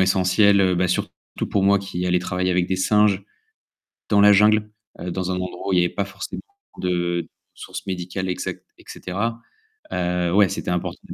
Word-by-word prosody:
essentiel, 95 +2 +4
heu 95 -1 +3
bah 90 +1 +2
surtout 90 - -1 0.4
pour 100 - +1
moi 100 0 +5
qui 90 -2 -4
allais 90 0 +2
travailler 90 +1 -1
avec 90 -1 +1
des 95 - 0
singes, 100 0 +2 0.9
dans 105 - +4
la 105 0 +8
jungle, 105 +1 +4 0.3
heu, 90 - -5
dans 95 +1 -2
un - - -1
endroit 90 +1 -5
où - - +1
il 90 - +4
y - - +4
avait 90 - -3
pas 100 - -1
forcément 100 +1 -7 0.3
beaucoup - - -11
de 85 -1 -1 0.2
sources - - -8
médicales, 95 0 -4
exactes 90 - -4
heu - - -45
et - - -18
cetera. 115 +6 -4 0.5
Heu, 90 -1 0
ouais, 100 -1 +5
c'était - - -4
important 90 -1 -3
dès - - -9
95 Hz, 205 wpm, -22 LUFS, 90-100 Hz, 0.9 s, la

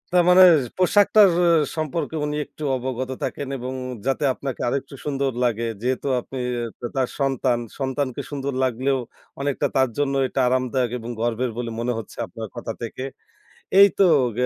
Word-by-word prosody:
তার 175 - +6
মানে 185 +1 +8 0.3
পোশাকটার 205 +2 +5 0.2
অ - - +4 0.3
সম্পর্কে 155 +1 -2
উনি 150 0 -2
একটু 155 - -11
অবগত 130 0 -4
থাকেন 140 - -3
এবং 130 +1 -5 0.3
যাতে 135 +2 0
আপনাকে 135 -1 -5
আরেকটু 140 +2 -3
সুন্দর 140 -2 0
লাগে। 115 -1 0 0.2
যেহেতু 130 +3 -1
আপনি 130 +2 -7 0.2
আ - - -2 0.2
তা 120 - -2
তার 130 -2 +1
সন্তান। 135 -3 +1 0.2
সন্তানকে 130 -1 -2
সুন্দর 140 -1 -3
লাগলেও 130 +2 +1 0.4
অনেকটা 140 -1 0
তার 130 -1 +3
জন্য 145 -1 +1
এটা 130 - -3
আরামদায়ক 130 -1 0
এবং 115 0 -8
গর্বের 120 +1 0
বলে 120 -1 -3
মনে 120 +1 0
হচ্ছে 110 - -10
আপনার 110 -1 -7
কথা 120 -1 -4
থেকে। 120 +2 -5 0.8
এই 200 - +10
তো - - +7 0.3
গে 125 - +2
130 Hz, 165 wpm, -23 LUFS, 125-140 Hz, 0.8 s, এই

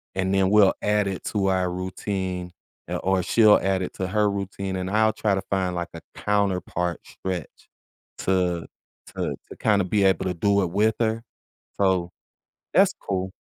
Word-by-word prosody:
and 95 0 0
then 95 -1 +3
we'll 105 -2 +6
add 105 0 +2
it 95 -2 -4
to 100 -2 0
our 95 -1 +1
routine, 90 0 -4 0.4
eh, - - -2
or 95 -1 +1
she'll 110 +2 +5
add 95 -1 +1
it - - -5
to 95 - -2
her 105 +1 +2
routine, 100 -1 -4
and 95 0 -3
I'll 110 +2 +3
try 105 -2 +1
to 95 - -3
find 95 -2 0
like 85 0 -3
a - - -8
counterpart 90 -4 0
stretch 95 -3 -6 0.5
to 90 -3 0 0.5
to - - -2
to - - -10
kinda 100 -3 +3
be 100 +2 +1
able 95 - +2
to 90 - 0
do 100 +3 +2
it 85 - -2
with 105 +3 +2
her, 115 0 0 0.6
so, 90 -2 +2 0.6
that's - - +5
cool. 95 -1 -2
95 Hz, 175 wpm, -24 LUFS, 90-100 Hz, 0.6 s, we'll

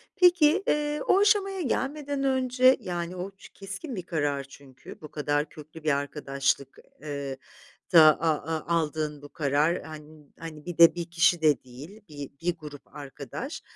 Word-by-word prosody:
Peki, 355 -1 +5
eee, 295 0 0
o 380 - +5
aşamaya 400 -2 +2
gelmeden 285 0 -2
önce, 260 -1 +3
yani, 175 0 -4
o 185 +2 -5
ç 195 - -16
keskin 200 - -7
bir 185 - -5
karar 145 -5 -1
çünkü, 135 -2 -14
bu 155 - -10
kadar 145 0 -1
köklü 155 +1 -13
bir 150 -2 +2
arkadaşlık, 140 -1 -2 0.2
eee, 140 -2 -5 0.6
da 165 - +10 0.2
a 165 - +2
a 160 +1 -4
aldığın 155 -2 -2
bu 145 - -11
karar, 150 +4 0
han 155 -1 -12
hani, 155 -2 -9
bir 175 -2 -6
de 170 0 +8
1 170 -1 -3
kişi 170 0 +3
de 150 -3 +3
değil, 140 - -12
bi 145 -2 -8
bir 175 0 -1
grup 150 -3 -12
arkadaş. 145 - -7
160 Hz, 160 wpm, -27 LUFS, -, 0.6 s, da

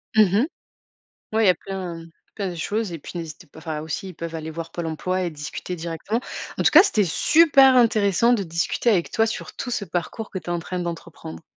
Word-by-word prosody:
Mmh 215 - +8 0.2
mh. - - -1 0.9
Ouais, 220 0 +3
il - - +5
y - - +9
a - - +3
plein 180 -3 -6 0.3
plein 200 -3 -2
de 175 - -7
choses 210 +5 -2
et 165 - -5
puis 160 - -10
n'hésitez 160 -3 -8
pas 160 - -15
enfin 155 -2 -4
aussi, 160 +4 -5
ils - - -8
peuvent 165 +1 -6
aller 160 0 -5
voir 165 +1 -7
Pôle 170 -1 -4
Emploi 180 +4 -2
et 175 - -1
discuter 155 +4 -6
directement. 170 +7 -3 0.4
En - - +2
tout - - +6
cas, 320 - +10
c'était 215 - +2
super 270 - +5
intéressant 225 -1 +4
de 225 -5 +2
discuter 170 +7 0
avec 180 -6 +1
toi 225 - +3
sur 225 - -5
tout 250 - -5
ce 230 -4 -2
parcours 185 +4 -4
que 190 - -4
tu - - -15
es 175 - -2
en 175 - 0
train 180 +2 -4
d'entreprendre. 170 -1 -7
180 Hz, 235 wpm, -23 LUFS, 165-215 Hz, 0.9 s, cas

